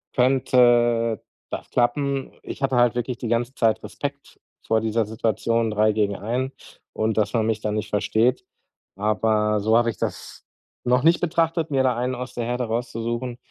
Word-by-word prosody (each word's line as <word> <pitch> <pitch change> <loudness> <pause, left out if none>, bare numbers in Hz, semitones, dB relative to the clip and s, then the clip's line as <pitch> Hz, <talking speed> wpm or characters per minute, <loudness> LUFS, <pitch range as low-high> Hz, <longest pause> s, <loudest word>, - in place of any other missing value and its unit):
könnte 120 -3 +3 0.3
das - - -6
klappen. 135 +3 0
Ich - - -8
hatte 135 -1 +1
halt 120 -1 +4
wirklich 120 0 -2
die 120 - -5
ganze 120 +2 0
Zeit 110 -4 +2
Respekt 140 0 -7 0.3
vor 110 0 +2
dieser 110 0 0
Situation 115 +1 0
3 110 +1 +3
gegen 105 -2 0
1 125 +6 -2 0.4
und 110 0 -1
dass 110 +2 +1
man 110 -2 +1
mich 110 -1 -1
dann 105 0 -2
nicht 105 -1 -3
versteht. 110 +4 +1 0.5
Aber 105 0 +1
so 110 +2 +3
habe 120 0 +3
ich 115 - -5
das - - -5 0.4
noch 125 +1 +2
nicht 165 +2 +4
betrachtet, 165 -2 0
mir 135 -1 +2
da 125 -2 +2
einen 125 +2 -1
aus 125 0 -6
der 120 -1 -3
Herde 125 +1 -1
rauszusuchen. 120 +1 -3
120 Hz, 175 wpm, -23 LUFS, 110-125 Hz, 0.5 s, halt